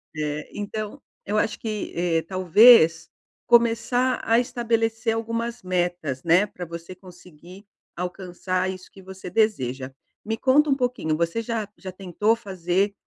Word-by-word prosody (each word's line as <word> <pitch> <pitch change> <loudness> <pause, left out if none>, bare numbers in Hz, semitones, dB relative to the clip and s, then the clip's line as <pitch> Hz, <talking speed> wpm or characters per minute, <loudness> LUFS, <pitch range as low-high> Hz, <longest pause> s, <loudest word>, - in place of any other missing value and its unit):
Eh, 150 0 -3
então 210 +1 -5 0.2
eu 210 +1 0
acho 220 - -1
que, 215 -2 -4
eh, 170 -1 +1
talvez 175 -1 +5 0.4
começar 240 +2 +3
a 230 - +3
estabelecer 230 -2 -1
algumas 230 +1 -3
metas, 175 -7 -2
né, 175 +4 +4
pra 180 -3 -8
você 170 +2 -8
conseguir 180 0 -15 0.3
alcançar 180 +1 -3
isso 185 -1 -8
que 195 - -14
você 190 0 -10
deseja. 135 - 0 0.3
Me 225 +1 -3
conta 290 +5 +3
um 275 - +3
pouquinho, 245 - -1
você 170 +6 -1
já 225 -2 -3
já 190 - -8
tentou 195 +4 0
fazer 195 -2 -1
190 Hz, 140 wpm, -24 LUFS, 175-225 Hz, 0.4 s, talvez